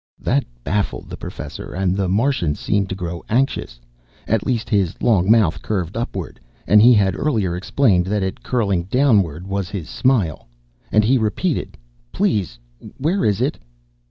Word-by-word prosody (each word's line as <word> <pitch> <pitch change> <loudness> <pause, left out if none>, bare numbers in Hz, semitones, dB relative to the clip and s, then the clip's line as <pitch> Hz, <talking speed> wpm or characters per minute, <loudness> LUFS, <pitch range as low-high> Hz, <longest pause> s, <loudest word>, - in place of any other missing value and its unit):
That - - 0 0.2
baffled 105 0 -2
the - - -4
Professor - - -8
and 95 0 0
the 95 -2 0
Martian 100 - +1
seemed 100 -2 -1
to 95 - -3
grow 85 -2 -5
anxious 115 - 0 0.5
at 110 -1 +1
least 120 -4 -1
his 100 -5 0
long 100 -5 +2
mouth 110 -8 +4
curved 95 -3 -3
upward, 115 +1 -4 0.3
and 105 0 +6
he 120 +2 +7
had 95 -3 +2
earlier 105 - 0
explained 95 -1 +2
that 105 0 0
it 95 - -4
curling 100 -8 0
downward 100 - +2
was 95 -2 -3
his 95 -7 -6
smile 110 - 0 0.4
and 105 - +4
he 125 +4 +3
repeated, 115 - -1 0.3
"Please, 95 - 0 0.4
where 170 +8 0
is 105 +1 +1
it?" 135 +4 -1
100 Hz, 155 wpm, -20 LUFS, 90-115 Hz, 0.5 s, he